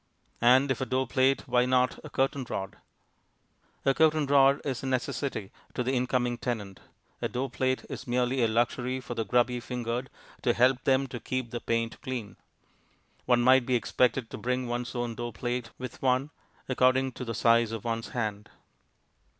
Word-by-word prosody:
And 130 +3 +5
if 130 - -2
a - - 0
door 130 0 +1
plate, 130 +2 +1
why 125 0 +3
not 125 0 +2
a - - -8
curtain 135 0 0
rod? 95 0 -4 1.1
A 135 - +4
curtain 155 0 +3
rod 140 0 +5
is 130 -4 -2
a 135 - -4
necessity 130 -4 -2 0.2
to 125 - 0
the 125 - 0
incoming 125 -1 0
tenant; 105 -6 -4 0.4
a - - +1
door 130 +1 -3
plate 130 +1 -1
is 140 - -7
merely 125 +1 +1
a - - +4
luxury 120 +3 0
for 125 - -6
the 115 - -1
grubby 125 +3 +2
fingered 120 +1 -3 0.3
to 120 - +2
help 125 +1 +3
them 135 0 +3
to 125 -2 -7
keep 130 -2 -3
the 120 - -3
paint 115 0 -2
clean. 120 -6 -5 0.9
One 125 -1 +4
might 130 0 +5
be 130 - +2
expected 120 0 +1
to - - -6
bring 125 +1 -1
one's 120 +1 -3
own 120 -1 -2
door 120 +1 -5
plate 120 0 -3
with 130 -2 -8
one, 130 +2 +1 0.4
according 130 +1 +3
to 125 - -7
the 115 -2 -4
size 115 +1 +3
of 115 -2 -5
one's 115 -1 -2
hand. 105 -4 -3
125 Hz, 180 wpm, -28 LUFS, 120-130 Hz, 1.1 s, And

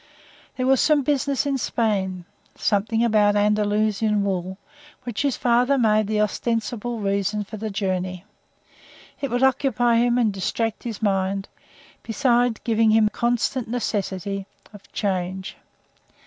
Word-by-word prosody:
There 255 - -2
was 265 -1 +4
some 300 -2 +3
business 280 0 0
in 275 -2 0
Spain 190 -7 -1 0.3
something 220 +3 +1
about 210 -2 +3
Andalusian 210 0 +1
wool 190 -1 -2 0.5
which 240 -4 -3
his 280 -3 0
father 250 +3 +2
made 215 -3 +3
the 215 0 +1
ostensible 230 +2 -2
reason 200 +1 -1
for 215 +2 -9
the 215 +1 -4
journey. 185 -2 -3 0.9
It 275 - -3
would 245 +2 0
occupy 245 -3 +2
him 240 +1 +2
and 225 -4 +2
distract 225 +3 -2
his 225 -2 -5
mind, 195 -1 0 0.5
besides 240 -1 +1
giving 225 -1 +2
him 215 -1 +4
constant 240 +2 -1
necessity 200 -4 -3 0.3
of 205 -1 -15
change. 190 -2 -3
215 Hz, 130 wpm, -23 LUFS, 200-240 Hz, 0.9 s, was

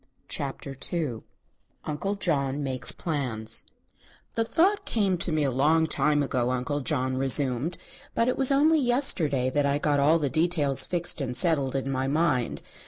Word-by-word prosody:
CHAPTER 140 0 -4 0.2
II 150 -10 -3 0.6
UNCLE 160 +7 -3
JOHN 145 -7 -1
MAKES 130 -2 +2
PLANS 125 -9 -2 0.7
"The 230 - 0
thought 370 - +1
came 200 -5 0
to 170 - +2
me 155 -1 0
a 135 - 0
long 155 +5 +2
time 150 -1 +1
ago," 125 -3 -1
Uncle 130 +3 -2
John 130 -3 -1
resumed; 135 +3 0 0.4
"but 230 - +2
it 255 - 0
was 270 0 +3
only 305 +3 +4
yesterday 165 - +2
that 145 +1 +1
I 140 0 +1
got 145 -1 0
all 150 +4 +4
the 150 -3 -1
details 155 -2 +2
fixed 175 -3 -2
and 125 -2 -2
settled 140 -4 +2
in 135 0 -2
my 130 0 -2
mind. 145 -4 0
145 Hz, 165 wpm, -26 LUFS, 135-170 Hz, 0.7 s, only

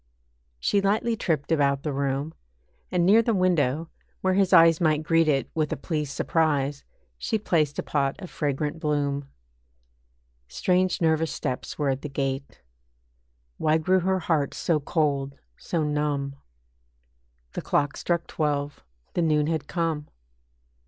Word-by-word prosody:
She 200 - +2
lightly 215 +4 +1
tripped 160 -7 -1
about 140 -3 +2
the 150 - -2
room, 140 +3 -1 0.6
And 175 -1 +2
near 210 +5 +6
the 230 -1 +1
window, 165 -4 +1 0.3
where 190 0 +2
his 195 -1 +2
eyes 165 -2 +6
Might 155 -2 +2
greet 165 0 +3
it 140 -3 +2
with 155 -2 -1
a - - -1
pleased 150 -1 -3
surprise, 145 -3 0 0.4
She 220 - 0
placed 155 -8 0
a - - -1
pot 140 +1 -1
of 185 -3 -9
fragrant 150 +1 -2
bloom. 145 -3 -1 1.2
Strange 180 - +1
nervous 160 -1 +2
steps 125 - -4
were 145 -2 0
at 135 0 -1
the 150 - -5
gate. 135 - -4 1.0
Why 155 0 +3
grew 185 +4 +2
her 190 +1 +1
heart 155 -5 0
so 165 -3 +1
cold, 140 -3 -1 0.2
so 165 -3 -2
numb? 145 -2 -1 1.2
The - - -3
clock 145 -1 0
struck 170 -1 -1
twelve, 145 -2 -2 0.3
the 175 - 0
noon 155 -2 +2
had 155 -2 -2
come. 165 -4 -2
155 Hz, 145 wpm, -26 LUFS, 140-170 Hz, 1.2 s, near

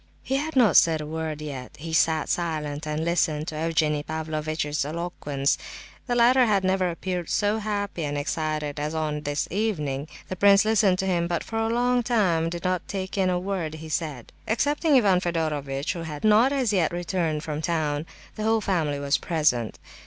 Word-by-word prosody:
He 270 - 0
had 305 +2 -3
not 235 -9 +5
said 160 -1 +5
a 150 - -5
word 155 -1 -4
yet; 135 -4 -7
he 160 +2 -7
sat 160 -1 +2
silent 155 -3 -2
and 155 +1 -2
listened 160 -3 0
to 155 - -7
Evgenie 155 -2 +1
Pavlovitch's 155 -1 -2
eloquence. 150 -3 -2 0.5
The 245 - 0
latter 245 +1 +5
had 200 -3 +2
never 185 -1 +1
appeared 175 0 -4
so 210 +1 +1
happy 205 -5 -3
and 145 -1 -2
excited 150 0 -2
as 150 +2 -3
on 155 -1 -2
this 145 0 -2
evening. 155 -9 -1 0.2
The 185 - -4
prince 200 +2 +5
listened 205 -4 +3
to 190 - -1
him, 175 -2 +1
but 170 -1 -1
for 225 - -4
a 225 0 0
long 245 +1 +2
time 185 -9 +1
did 170 0 -6
not 185 -1 -1
take 190 -1 -4
in 190 -2 +2
a 180 - +1
word 180 -4 -3
he 160 0 -9
said. 150 -6 -3 0.2
Excepting 290 +6 +2
Ivan 195 -7 +4
Fedorovitch, 150 -5 -2
who 170 - -6
had 150 -3 -6
not 220 +5 +5
as 260 -6 +1
yet 180 -5 +2
returned 170 -3 -2
from 150 -1 -4
town, 155 -2 -1 0.3
the 215 - -3
whole 225 +1 +3
family 165 -8 0
was 140 0 +1
present. 150 -9 0
165 Hz, 190 wpm, -25 LUFS, 150-200 Hz, 0.5 s, not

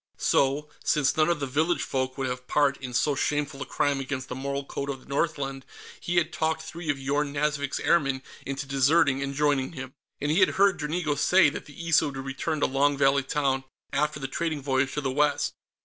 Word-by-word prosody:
So, 140 +2 +2 0.2
since 145 -2 +2
none 155 +1 +3
of 170 -3 +1
the 140 - -1
village 155 +6 +1
folk 130 -1 -2
would 135 - -1
have 125 0 -4
part 145 -2 +3
in 130 -2 -7
so 145 +5 +2
shameful 140 0 -1
a - - -4
crime 145 -1 0
against 130 -1 -4
the 125 - -4
moral 140 +1 -3
code 140 0 -4
of 135 -1 -3
the - - -19
Northland, 140 -2 -2 0.4
he 175 0 -2
had 170 0 +2
talked 160 0 -1
three 165 +1 -7
of 145 - +1
Yorn 140 +2 -1
Nazvik's 145 -1 -1
airmen 140 -5 +2 0.2
into 140 +1 -4
deserting 135 +1 +3
and 140 0 -3
joining 145 -1 +1
him. 130 -3 -7 0.3
And 145 +1 0
he 160 - +3
had 185 - +6
heard 195 -2 +4
Dranigo 155 0 -1
say 180 +3 +5
that - - -7
the 165 +3 -9
Issa 160 -1 +4
would 140 -1 -6
return 135 +3 -3
to - - +4
Long 140 +1 +2
Valley 140 0 +4
Town 135 -1 0 0.3
after 150 +1 0
the 135 - -3
trading 155 +1 -2
voyage 135 -1 0
to 150 - -1
the 135 -2 -1
west. 145 +2 +1
140 Hz, 215 wpm, -27 LUFS, 135-150 Hz, 0.4 s, had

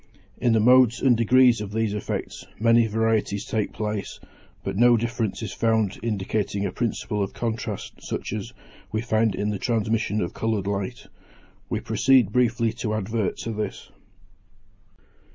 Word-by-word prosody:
In 120 -1 +2
the 110 - +4
modes 125 +1 +5
and 130 -3 +4
degrees 120 0 +4
of 105 -1 -5
these 110 -1 0
effects 105 - -4 0.2
many 115 +1 +4
varieties 110 -2 0
take 110 -2 -1
place, 105 -2 -4 0.4
but - - -3
no 120 +3 +5
difference 115 -1 -2
is 105 - -5
found 110 -3 +1
indicating 100 -2 -2
a 95 - -2
principle 105 -1 -2
of 100 - -2
contrast 110 -3 -4
such - - -4
as - - -5 0.4
we 110 - -1
find 110 -3 +1
in 105 +1 -1
the 100 - -3
transmission 110 -2 0
of 85 - -2
coloured 110 -3 -1
light. 100 +4 -3 0.6
We - - -2
proceed 130 -7 +3
briefly 120 -1 +2
to 110 -2 -1
advert 110 0 -2
to 115 - -4
this. 105 -2 -5
110 Hz, 150 wpm, -24 LUFS, 105-115 Hz, 0.6 s, modes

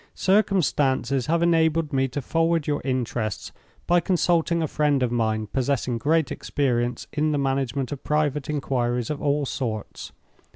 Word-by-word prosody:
Circumstances 140 - +1
have 170 +1 +2
enabled 160 -2 +2
me 135 0 +2
to 135 +2 -5
forward 165 +1 +1
your 145 -1 -1
interests, 120 -5 -2 0.3
by 175 0 +4
consulting 170 -1 +1
a - - 0
friend 145 -3 +1
of 120 - 0
mine 110 -2 0
possessing 125 0 -1
great 160 +3 +1
experience 120 -4 -1
in 155 +1 +1
the - - +1
management 135 -1 -1
of 145 - -6
private 150 -2 0
inquiries 125 -4 -1
of 150 - -4
all 145 -1 +1
sorts. 115 -6 -5
140 Hz, 150 wpm, -24 LUFS, 125-160 Hz, 0.3 s, by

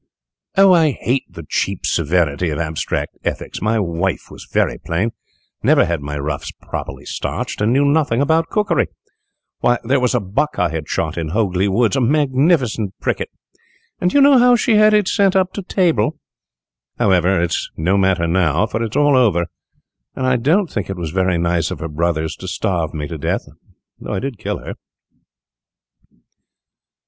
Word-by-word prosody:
"Oh, 195 -1 +7
I 160 -5 +4
hate 130 -4 -1
the 85 -2 -10
cheap - - -2
severity 85 0 +1
of 75 - -3
abstract 80 -1 -3
ethics! - - -4
My 110 +3 +1
wife 90 -1 -2
was - - -11
very - - +1
plain, 95 +8 -1 0.5
never - - +4
had 85 -3 -2
my 75 +1 -5
ruffs 70 0 -4
properly - - -7
starched, - - -4
and 105 +2 +2
knew 140 +3 +3
nothing 140 -5 +2
about 160 +3 +2
cookery. 210 -1 +1 0.7
Why, 120 0 +2
there 130 +4 +2
was 125 0 +1
a - - +3
buck 105 +9 -2
I - - +1
had 80 -1 -5
shot 80 +1 -2
in 80 -2 -3
Hogley 95 0 0
Woods, 115 +6 +2
a 135 - +1
magnificent 130 - +1
pricket, - - -2 0.7
and 180 - +2
do 285 - +1
you - - +6
know 275 -2 +7
how 245 0 +6
she 235 0 +1
had 215 0 +6
it 210 -3 +2
sent 195 -1 +2
to 190 +1 +1
table? 175 -4 +1 0.8
However, 90 -1 +3
it 85 -1 0
is - - -2
no 85 +5 +1
matter 95 -3 +2
now, 85 +1 +2
for 110 +1 -3
it 115 - -1
is - - -1
all 145 -1 +4
over, 105 -9 +3 0.7
and 130 - -2
I 130 -1 +3
don't 155 - +2
think 105 - -5
it 95 - -4
was 85 -3 -4
very 95 -1 +1
nice 85 -1 0
of - - -5
her 80 - -5
brothers 80 0 -1
to 95 - -8
starve 90 -3 -1
me 75 -2 -4
to 80 +1 -7
death, - - -2 0.5
though - - -6
I - - -1
did 135 -4 -5
kill - - -3
her." - - -7
105 Hz, 180 wpm, -19 LUFS, -, 0.8 s, Oh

